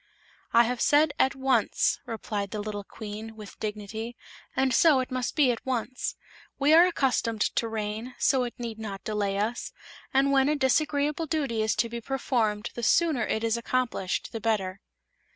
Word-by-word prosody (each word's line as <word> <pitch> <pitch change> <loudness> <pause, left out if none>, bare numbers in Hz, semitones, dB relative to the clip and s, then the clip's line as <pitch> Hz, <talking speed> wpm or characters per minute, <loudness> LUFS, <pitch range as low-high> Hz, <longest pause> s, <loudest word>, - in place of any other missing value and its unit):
"I 235 - +6
have 245 +1 -2
said 295 0 +4
'at 265 - +3
once'," 265 0 +1
replied 210 -3 -3
the 210 - -4
little 205 -1 -4
Queen, 220 +2 -8
with 210 -2 -11
dignity, 220 +2 -5 0.4
"and 265 -1 +2
so 295 +2 +5
it 255 - -3
must 255 -1 -2
be 280 -5 +4
at 230 - -5
once. 255 0 -2 0.4
We 285 +2 +4
are 340 +3 +8
accustomed 250 -9 0
to 230 - 0
rain, 220 +2 -4
so 265 -2 +3
it 240 - -5
need 230 -2 -6
not 200 -3 -6
delay 205 -2 -1
us, 220 +4 -2 0.4
and 275 +1 +3
when 270 0 +4
a 300 - +2
disagreeable 295 +3 +1
duty 275 -8 -1
is 220 0 +1
to 215 +2 +1
be 235 0 -6
performed 230 -5 -1
the 240 - -5
sooner 290 -1 +2
it 220 - -1
is 230 0 +1
accomplished 235 -6 -1
the 225 - -5
better." 200 -4 -1
235 Hz, 175 wpm, -27 LUFS, 215-270 Hz, 0.4 s, are